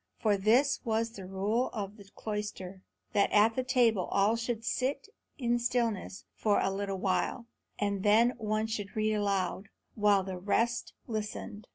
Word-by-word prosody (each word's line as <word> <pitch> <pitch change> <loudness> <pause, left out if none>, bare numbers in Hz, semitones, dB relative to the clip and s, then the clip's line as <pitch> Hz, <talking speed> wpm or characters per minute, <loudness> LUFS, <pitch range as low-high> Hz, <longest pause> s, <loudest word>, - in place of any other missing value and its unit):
For 210 -2 +2
this 235 +8 +3
was 225 -1 0
the 195 -5 -9
rule 205 +6 0
of 205 -1 -5
the 200 - -13
cloister, 210 -3 -5 0.3
that 200 - +3
at 215 +2 +5
the 255 - +1
table 240 -7 +3
all 200 +3 +2
should 230 -1 -3
sit 275 - -1 0.3
in 240 -2 +1
stillness 235 -5 -1
for 210 -2 +2
a 195 - +1
little 195 0 -3
while, 185 +5 -1 0.3
and 200 -2 -1
then 220 +4 +5
one 215 0 0
should 220 -1 -4
read 215 0 +1
aloud, 200 -1 -1 0.2
while 205 -2 +3
the 185 -1 -5
rest 230 +5 0
listened. 215 -2 -5
210 Hz, 160 wpm, -30 LUFS, 200-230 Hz, 0.3 s, at